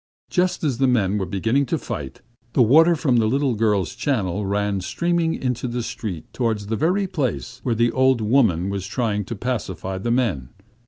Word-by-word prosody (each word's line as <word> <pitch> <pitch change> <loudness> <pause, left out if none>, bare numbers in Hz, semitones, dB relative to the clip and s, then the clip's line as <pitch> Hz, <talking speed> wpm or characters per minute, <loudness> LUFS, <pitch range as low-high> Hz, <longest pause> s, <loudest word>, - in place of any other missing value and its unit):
Just 180 -1 +1
as 135 -6 0
the 135 - +3
men 105 -5 +2
were 95 - -2
beginning 115 +8 0
to - - 0
fight, 70 -3 -6 0.3
the 125 - +5
water 160 +9 +6
from 135 -6 +1
the 110 -2 +3
little 135 +2 +1
girls' 105 -5 +1
channel 105 -7 -1
ran 100 -1 0
streaming 170 - 0
into 125 -1 -2
the 120 0 -3
street 95 -8 -5
towards 110 -4 -1
the 110 +2 -2
very 180 - +1
place 130 -8 -3
where 120 -3 0
the 115 +1 +2
old 130 -1 +3
woman 105 -6 +2
was 100 -1 -4
trying 105 -2 -1
to 115 - -5
pacify 95 -6 -3
the 115 - -3
men. 110 - 0
115 Hz, 190 wpm, -22 LUFS, 100-130 Hz, 0.3 s, water